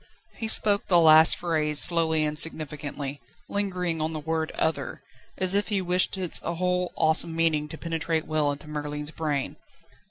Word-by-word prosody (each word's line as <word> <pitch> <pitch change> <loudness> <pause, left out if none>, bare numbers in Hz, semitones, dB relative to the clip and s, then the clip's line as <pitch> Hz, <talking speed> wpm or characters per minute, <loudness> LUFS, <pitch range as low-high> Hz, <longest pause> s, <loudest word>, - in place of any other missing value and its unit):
He 225 - -4
spoke 205 -2 +4
this 180 - +2
last 160 -1 +7
phrase 155 -3 -2
slowly 160 -2 +1
and 150 0 -2
significantly, 145 -3 0 0.3
lingering 180 -5 -2
on 160 +1 -2
the 155 - -4
word 160 +1 -2
"other," 160 -2 -3 0.3
as 185 0 0
if 205 +1 +1
he 205 -2 0
wished 180 +1 +1
its 180 -3 0
whole 180 +1 -2
awesome 160 +1 +1
meaning 155 -2 0
to 160 - -8
penetrate 165 -1 -3
well 155 -2 0
into 145 +1 -9
Merlin's 150 0 -5
brain. 150 -4 -3
160 Hz, 160 wpm, -25 LUFS, 150-180 Hz, 0.3 s, last